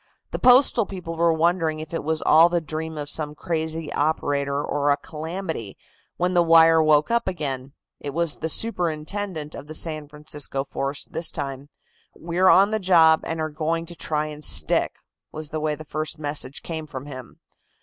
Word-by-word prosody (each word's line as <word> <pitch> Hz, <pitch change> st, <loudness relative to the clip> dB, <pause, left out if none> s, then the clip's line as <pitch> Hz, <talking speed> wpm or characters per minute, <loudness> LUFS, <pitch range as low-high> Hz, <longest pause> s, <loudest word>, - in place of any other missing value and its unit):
The -, -, -3 dB
Postal 250 Hz, -3 st, +5 dB
people 180 Hz, -4 st, -6 dB
were 170 Hz, 0 st, +3 dB
wondering 165 Hz, -1 st, +1 dB
if 155 Hz, +1 st, -8 dB
it 165 Hz, -, -2 dB
was 160 Hz, +1 st, -1 dB
all 165 Hz, +2 st, +6 dB
the 175 Hz, 0 st, +1 dB
dream 160 Hz, 0 st, -5 dB
of 145 Hz, -1 st, -4 dB
some 150 Hz, 0 st, -2 dB
crazy 160 Hz, -1 st, -3 dB
operator 145 Hz, -2 st, 0 dB
or 145 Hz, 0 st, 0 dB
a 145 Hz, -, +3 dB
calamity, 160 Hz, -, -6 dB, 0.4 s
when 180 Hz, +1 st, 0 dB
the 175 Hz, -, +4 dB
wire 165 Hz, -1 st, +6 dB
woke 155 Hz, +3 st, +3 dB
up 235 Hz, -2 st, +1 dB
again. 140 Hz, -7 st, -4 dB, 0.3 s
It 145 Hz, -, -5 dB
was 170 Hz, 0 st, -1 dB
the 160 Hz, -, -3 dB
superintendent 170 Hz, -3 st, -1 dB
of 145 Hz, -, -9 dB
the 155 Hz, -, -5 dB
San 155 Hz, -3 st, 0 dB
Francisco 150 Hz, -2 st, -3 dB
force 135 Hz, 0 st, -4 dB
this 165 Hz, -, -2 dB
time. 140 Hz, -1 st, -5 dB, 0.5 s
"We're 175 Hz, +3 st, +1 dB
on 195 Hz, +3 st, +6 dB
the 220 Hz, -, 0 dB
job, 165 Hz, -4 st, +5 dB
and 160 Hz, 0 st, -3 dB
are 155 Hz, 0 st, -1 dB
going 160 Hz, +2 st, -2 dB
to 175 Hz, +1 st, -8 dB
try 155 Hz, -2 st, -1 dB
and 150 Hz, 0 st, -8 dB
stick," -, -, +3 dB, 0.4 s
was 155 Hz, -1 st, -7 dB
the 155 Hz, -, -2 dB
way 155 Hz, 0 st, -1 dB
the 155 Hz, -, -11 dB
first 155 Hz, +1 st, -4 dB
message 145 Hz, -3 st, -3 dB
came 160 Hz, -2 st, -5 dB
from 135 Hz, -2 st, -7 dB
him. 130 Hz, -4 st, -10 dB
155 Hz, 185 wpm, -23 LUFS, 150-170 Hz, 0.5 s, all